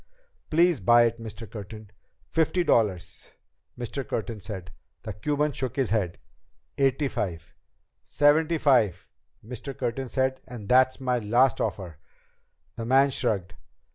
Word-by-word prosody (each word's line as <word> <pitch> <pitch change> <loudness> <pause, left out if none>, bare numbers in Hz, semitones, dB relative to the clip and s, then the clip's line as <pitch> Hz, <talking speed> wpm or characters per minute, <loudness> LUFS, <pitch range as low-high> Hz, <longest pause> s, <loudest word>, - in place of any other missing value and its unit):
"Please 170 0 +3
buy 120 +5 +5
it, 115 0 0
Mr. 115 0 -8
Curtin." 105 0 -10 0.4
"Fifty 165 +2 +2
dollars," 95 - 0 0.4
Mr. 125 +3 -4
Curtin 110 -2 -4
said. 95 -4 -8 0.3
The 110 - -5
Cuban 150 +8 0
shook 130 -3 -4
his 135 -6 0
head. 100 -6 0 0.6
"Eighty 135 +1 +2
five." 90 -10 -4 0.5
"Seventy 155 +3 +3
five," 125 - +2 0.3
Mr. 125 +3 -7
Curtin 125 +2 -3
said, 130 0 0
"and 115 -5 -9
that's 130 +2 +4
my 125 -2 0
last 120 +4 +2
offer." 95 -7 -4 0.8
The 115 - -4
man 135 +2 +4
shrugged. 95 -8 -1
120 Hz, 130 wpm, -26 LUFS, 105-135 Hz, 0.8 s, buy